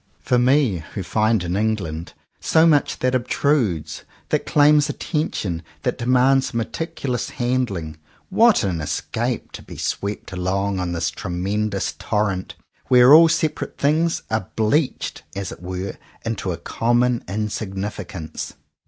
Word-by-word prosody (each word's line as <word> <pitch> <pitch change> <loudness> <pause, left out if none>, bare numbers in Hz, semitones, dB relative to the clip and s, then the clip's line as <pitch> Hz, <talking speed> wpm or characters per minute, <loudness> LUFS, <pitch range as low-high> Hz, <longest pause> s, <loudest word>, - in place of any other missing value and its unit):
For 125 - +1
me, 125 - +3
who 95 - -2
find 110 +1 +1
in 90 +1 -2
England 95 -6 -2 0.3
so 160 0 +4
much 150 -3 +3
that 130 0 +1
obtrudes, 120 - 0 0.3
that - - 0
claims 150 0 +5
attention, 100 - -2 0.2
that - - -1
de 120 - -3
mands 130 +1 +3
meticulous 125 +1 -3
handling, 115 -11 -2 0.3
what 225 - +5
an 90 -5 -1
escape, 75 - -3
to - - -9
be - - -11
swept 100 0 -3
along 95 +1 -1
on 90 -1 -2
this 85 -2 -1
tremendous 100 +3 -2
tor 105 -2 +1
rent, 95 -1 -5 0.3
where 125 +2 +7
all 165 +2 +9
separate 160 -2 -1
things 160 +4 +1
are 110 -4 -1
bleached, 125 +7 0
as 100 -2 -4
it - - -10
were, 95 +1 -5 0.3
into 110 -5 -2
a 85 - -3
common 120 +1 +1
insignificance! 100 -5 -4
110 Hz, 135 wpm, -22 LUFS, 95-130 Hz, 0.3 s, all